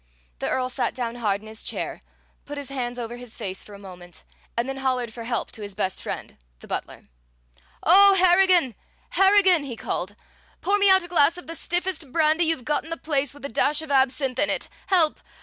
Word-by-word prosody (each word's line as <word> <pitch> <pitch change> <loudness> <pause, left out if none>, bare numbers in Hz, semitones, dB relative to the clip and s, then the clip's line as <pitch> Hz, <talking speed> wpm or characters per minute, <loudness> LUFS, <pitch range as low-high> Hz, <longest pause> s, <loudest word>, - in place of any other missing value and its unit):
The - - -2
Earl 255 -1 0
sat 250 - -2
down 240 -1 -3
hard 205 -4 0
in 215 - -13
his 220 0 -4
chair, - - -4 0.5
put 290 0 -6
his 285 -1 -6
hands 245 -3 -4
over 240 0 -5
his 245 -2 -8
face 190 -4 -5
for 205 - -12
a - - -10
moment, 180 -3 -12 0.3
and 235 +2 0
then 270 0 -4
hollered 255 -4 -1
for 230 -1 -8
help 235 -1 -2
to 220 - -8
his 205 -2 -6
best 190 -2 -2
friend, - - -6 0.2
the - - -15
butler. - - -5 0.8
"O 395 +3 +7
Harrigan, 360 -6 +5 0.4
Harrigan!" 385 -4 +5
he 260 -4 -6
called, 200 -2 -4 0.4
"pour 405 +3 +1
me 400 -1 +6
out 380 -1 +6
a - - -8
glass 335 -1 +3
of 355 - -10
the 330 - -7
stiffest 350 -3 -2
brandy 320 +2 +3
you've 315 -6 -1
got 300 +1 0
in 320 - -7
the 330 - -3
place, 290 -4 -1
with 285 - -10
a - - -4
dash 295 +7 +1
of 310 - -8
absinthe 265 -1 +1
in 295 - +2
it! - - -2 0.2
Help! 340 -5 +3
275 Hz, 215 wpm, -24 LUFS, 235-335 Hz, 0.8 s, O